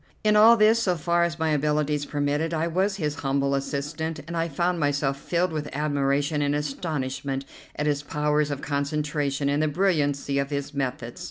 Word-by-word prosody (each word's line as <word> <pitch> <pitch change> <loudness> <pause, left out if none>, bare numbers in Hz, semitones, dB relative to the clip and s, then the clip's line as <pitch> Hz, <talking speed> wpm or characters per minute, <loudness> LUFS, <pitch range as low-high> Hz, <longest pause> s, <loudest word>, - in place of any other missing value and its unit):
In 210 0 +4
all 225 +2 +8
this, 220 +2 +5
so 185 -5 +1
far 170 +1 +1
as 170 0 -3
my 160 -1 0
abilities 150 0 0
permitted, 145 +3 -1
I 160 +1 0
was 190 +4 0
his 150 -6 -2
humble 140 0 0
assistant, 150 +3 -3
and 170 +1 -6
I 165 0 0
found 175 +3 0
myself 145 -2 +1
filled 175 +3 0
with 150 -2 -3
admiration 145 0 0
and 145 0 +1
astonishment 140 -2 -3 0.3
at 150 - -2
his 145 -1 +1
powers 150 0 0
of 140 -1 -4
concentration 145 -1 -1
and 145 +1 +1
the 155 - +2
brilliancy 145 -5 +1
of 140 0 -1
his 140 0 -3
methods. 125 -4 -3
150 Hz, 180 wpm, -25 LUFS, 140-165 Hz, 0.3 s, all